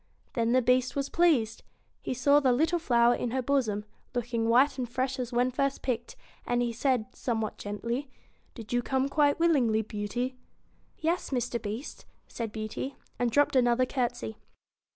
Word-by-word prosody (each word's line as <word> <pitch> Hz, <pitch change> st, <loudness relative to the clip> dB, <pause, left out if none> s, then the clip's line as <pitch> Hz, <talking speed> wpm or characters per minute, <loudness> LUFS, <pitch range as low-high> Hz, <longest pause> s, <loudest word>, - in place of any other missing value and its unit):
Then 230 Hz, -1 st, +1 dB
the 255 Hz, 0 st, +4 dB
Beast 250 Hz, +1 st, +2 dB
was 280 Hz, 0 st, -1 dB
pleased. 280 Hz, -11 st, +2 dB, 0.4 s
He -, -, -3 dB
saw 280 Hz, +4 st, +5 dB
the 265 Hz, -3 st, +3 dB
little 320 Hz, +7 st, +2 dB
flower 240 Hz, -6 st, +4 dB
in 245 Hz, -, -2 dB
her 260 Hz, +2 st, -1 dB
bosom, 235 Hz, -6 st, 0 dB, 0.3 s
looking 235 Hz, -1 st, -1 dB
white 270 Hz, +4 st, +4 dB
and 245 Hz, -2 st, -2 dB
fresh 260 Hz, +2 st, -2 dB
as 250 Hz, -1 st, -3 dB
when 245 Hz, +1 st, +2 dB
first 275 Hz, +2 st, -1 dB
picked; 240 Hz, -2 st, -2 dB, 0.3 s
and 245 Hz, 0 st, 0 dB
he 235 Hz, -1 st, -1 dB
said, 250 Hz, -1 st, +1 dB
somewhat 220 Hz, -3 st, -2 dB
gently 235 Hz, +7 st, -3 dB, 0.2 s
' -, -, -38 dB
Did 230 Hz, -1 st, -8 dB
you 245 Hz, -, +2 dB
come 265 Hz, +2 st, 0 dB
quite 290 Hz, +1 st, +3 dB
willingly, 255 Hz, -10 st, +3 dB
Beauty? 235 Hz, +5 st, -3 dB, 0.3 s
' -, -, -38 dB
'Yes, 335 Hz, +3 st, -1 dB
Mr. 245 Hz, -3 st, -1 dB
Beast,' 220 Hz, +6 st, -6 dB, 0.2 s
said 230 Hz, -3 st, -5 dB
Beauty, 215 Hz, +5 st, -5 dB, 0.2 s
and 245 Hz, -1 st, +2 dB
dropped 285 Hz, +4 st, +3 dB
another 245 Hz, 0 st, +4 dB
courtesy. 240 Hz, -, -2 dB
245 Hz, 175 wpm, -29 LUFS, 230-270 Hz, 0.4 s, saw